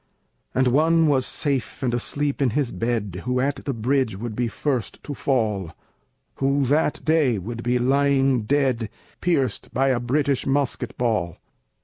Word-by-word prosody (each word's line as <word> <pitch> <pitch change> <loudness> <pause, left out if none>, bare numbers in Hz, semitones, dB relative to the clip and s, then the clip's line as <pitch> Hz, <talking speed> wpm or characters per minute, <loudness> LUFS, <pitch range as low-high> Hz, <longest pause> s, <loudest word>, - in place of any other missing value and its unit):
And 130 -1 +3
one 160 +5 +4
was 135 -3 +2
safe 140 -1 -2
and 120 -2 0
asleep 140 +4 -1
in 135 - +3
his 140 -5 0
bed 110 -6 -2
Who 125 0 0
at 140 +2 0
the 140 - 0
bridge 125 -2 0
would 110 +1 -5
be 120 +1 0
first 130 -1 -2
to 145 - -5
fall, 105 - -1 0.6
Who 140 +1 +1
that 150 +3 +1
day 155 -8 +3
would 115 +5 -5
be 120 +1 +1
lying 135 -1 +2
dead, 130 -4 +1 0.3
Pierced 145 -8 0
by 135 +2 +3
a 125 -2 +2
British 135 +2 0
musket 140 0 -1
ball. 105 -9 0
130 Hz, 155 wpm, -23 LUFS, 120-140 Hz, 0.6 s, one